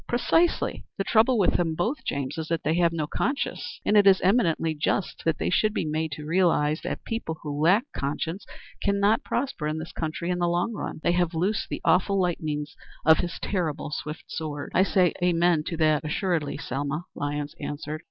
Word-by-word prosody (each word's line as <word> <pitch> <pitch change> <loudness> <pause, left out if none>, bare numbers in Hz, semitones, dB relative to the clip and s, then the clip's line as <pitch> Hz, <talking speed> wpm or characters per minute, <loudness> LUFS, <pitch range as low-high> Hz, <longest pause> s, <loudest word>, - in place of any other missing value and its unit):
"Precisely. 325 +8 +1
The 195 - 0
trouble 230 +4 +4
with 195 - +3
them 165 -2 0
both, 225 - -1
James, 140 +2 -3
is 160 - -4
that 165 0 -1
they 155 - +1
have 170 0 +3
no 160 -2 -2
conscience; 270 - -3
and 210 - +3
it 205 -1 +6
is 190 -1 +7
eminently 170 -6 +2
just 155 +5 -1 0.2
they - - -1
should 215 +3 +2
be - - 0
made 155 0 -1
to 150 +1 -7
realize 160 -3 +2
that - - -5
people 225 -8 -3
who 145 -1 -3
lack 190 +9 +5
conscience 160 +7 -3 0.4
cannot 200 +2 +2
prosper 250 - -2
in 155 +1 -2
this 160 +1 -6
country 165 +2 -3
in 180 - -1
the 175 - +2
long 175 +7 0
run. 205 - -5
'They - - +3
have 175 -1 +1
loosed 200 +7 0
the - - -4
awful 195 +2 +3
lightnings 155 -5 -2 0.3
of 160 0 +6
his 175 -1 -3
terrible 165 -7 -2
swift 150 +1 -5
sword.'" 150 -2 -5
"I - - +4
say 185 -2 +3
'amen' 170 -2 +3
to 170 - -3
that 155 -1 +3
assuredly, 155 -2 -1
Selma," 145 +5 -3
Lyons 145 0 -3
answered. 150 +1 -5
165 Hz, 190 wpm, -26 LUFS, 155-190 Hz, 0.4 s, is